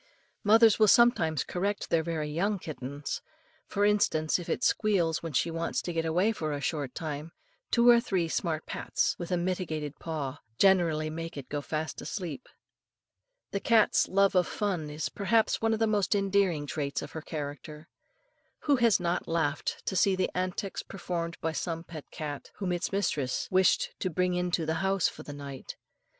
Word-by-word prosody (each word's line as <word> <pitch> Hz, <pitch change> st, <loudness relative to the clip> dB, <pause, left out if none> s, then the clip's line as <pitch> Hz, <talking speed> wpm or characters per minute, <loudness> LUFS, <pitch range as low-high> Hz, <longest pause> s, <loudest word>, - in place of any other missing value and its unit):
Mothers 225 Hz, +1 st, +6 dB
will 215 Hz, -, +6 dB
sometimes 190 Hz, -, +4 dB
correct 200 Hz, +3 st, -2 dB
their 165 Hz, -, +4 dB
very 160 Hz, -2 st, -2 dB
young 195 Hz, +7 st, 0 dB
kittens; 145 Hz, -3 st, -5 dB, 0.5 s
for 205 Hz, +1 st, +1 dB
instance, 185 Hz, -6 st, +2 dB
if 175 Hz, -, -8 dB
it -, -, -1 dB
squeals 180 Hz, -10 st, +2 dB
when 165 Hz, -, -5 dB
she 165 Hz, +4 st, +1 dB
wants 165 Hz, 0 st, -2 dB
to 175 Hz, -, -3 dB
get 165 Hz, 0 st, -1 dB
away 180 Hz, +7 st, +2 dB
for 155 Hz, -8 st, -3 dB
a 145 Hz, -, -3 dB
short 145 Hz, -3 st, -3 dB
time, 155 Hz, 0 st, -5 dB, 0.4 s
two 235 Hz, 0 st, +4 dB
or 240 Hz, -1 st, +8 dB
three 190 Hz, -8 st, 0 dB
smart 160 Hz, -1 st, -2 dB
pats -, -, -1 dB
with 175 Hz, -, -5 dB
a 180 Hz, -, +2 dB
mittened 170 Hz, -5 st, -2 dB
paw 145 Hz, -4 st, -4 dB, 0.2 s
generally 165 Hz, -5 st, +3 dB
make 165 Hz, 0 st, -6 dB
it 135 Hz, -, -7 dB
go 145 Hz, 0 st, -2 dB
fast 155 Hz, +2 st, -4 dB
asleep. 185 Hz, +3 st, -5 dB, 1.0 s
The 200 Hz, -, -1 dB
cat's 220 Hz, +1 st, +4 dB
love 195 Hz, +1 st, +3 dB
of 180 Hz, -2 st, +3 dB
fun 185 Hz, -7 st, -2 dB
is 150 Hz, +1 st, -3 dB
perhaps 215 Hz, +3 st, +1 dB
one 225 Hz, 0 st, +2 dB
of 220 Hz, -, +1 dB
the 225 Hz, -, +2 dB
most 210 Hz, -2 st, +1 dB
endearing 195 Hz, -6 st, +1 dB
traits 140 Hz, -1 st, -3 dB
in -, -, -5 dB
her 160 Hz, -, -6 dB
character. 150 Hz, +1 st, -7 dB, 0.7 s
Who 285 Hz, -2 st, +3 dB
has 235 Hz, -5 st, +4 dB
not 175 Hz, 0 st, -1 dB
laughed 160 Hz, -3 st, -1 dB
to 190 Hz, -, -2 dB
see 190 Hz, +1 st, +4 dB
the 185 Hz, 0 st, 0 dB
antics 185 Hz, +2 st, -2 dB
performed 175 Hz, -3 st, -4 dB
by 160 Hz, -, 0 dB
some 165 Hz, 0 st, -3 dB
pet 160 Hz, -3 st, -10 dB
cat, 145 Hz, -2 st, -6 dB
whom 190 Hz, -3 st, -2 dB
its 175 Hz, -1 st, -1 dB
mistress 150 Hz, -10 st, -1 dB
wished 185 Hz, 0 st, +3 dB
to 185 Hz, -, -1 dB
bring 180 Hz, +2 st, 0 dB
into 180 Hz, -2 st, 0 dB
the 160 Hz, -, 0 dB
house 195 Hz, -2 st, +2 dB
for -, -, -7 dB
the -, -, -8 dB
night. 140 Hz, -2 st, -8 dB
170 Hz, 180 wpm, -29 LUFS, 155-195 Hz, 1.0 s, or